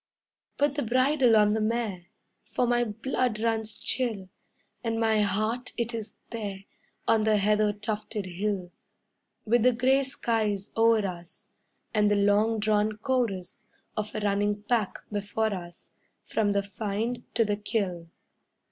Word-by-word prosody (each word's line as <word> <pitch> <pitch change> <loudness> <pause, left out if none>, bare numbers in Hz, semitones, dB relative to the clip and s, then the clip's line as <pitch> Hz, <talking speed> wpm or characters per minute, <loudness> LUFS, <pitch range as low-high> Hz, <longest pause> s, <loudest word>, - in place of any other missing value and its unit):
Put 290 -1 +2
the 290 - -1
bridle 255 0 +3
on 210 -1 +5
the 220 - 0
mare, 215 -5 -1 0.3
For 250 - -1
my 240 0 +2
blood 235 +1 -1
runs 220 -1 -1
chill; 220 -8 -1 0.5
And 225 -1 -1
my 220 -1 +3
heart, 215 +5 -1
it 235 0 -1
is 225 -1 -6 0.2
there, 205 -4 -5 0.4
On 225 -1 +4
the 215 -1 +3
heather 210 +1 +3
tufted 210 0 -4
hill, 185 0 -3 0.7
With 235 +2 +3
the 250 +2 +5
gray 260 +3 +3
skies 220 -6 -1
o'er 225 -2 +4
us, 175 -2 -7 0.4
And 210 -2 +3
the 205 - +3
long 205 +2 +3
drawn 215 0 +2
chorus 220 -7 -2 0.3
Of 215 +1 -3
a 215 - -2
running 205 0 0
pack 220 -3 -1
before 205 +1 -1
us 175 -2 -9 0.3
From 205 -2 0
the 200 0 +1
find 215 +4 -3
to 230 - +4
the 205 -1 0
kill. 190 -5 -2
215 Hz, 145 wpm, -28 LUFS, 205-230 Hz, 0.7 s, on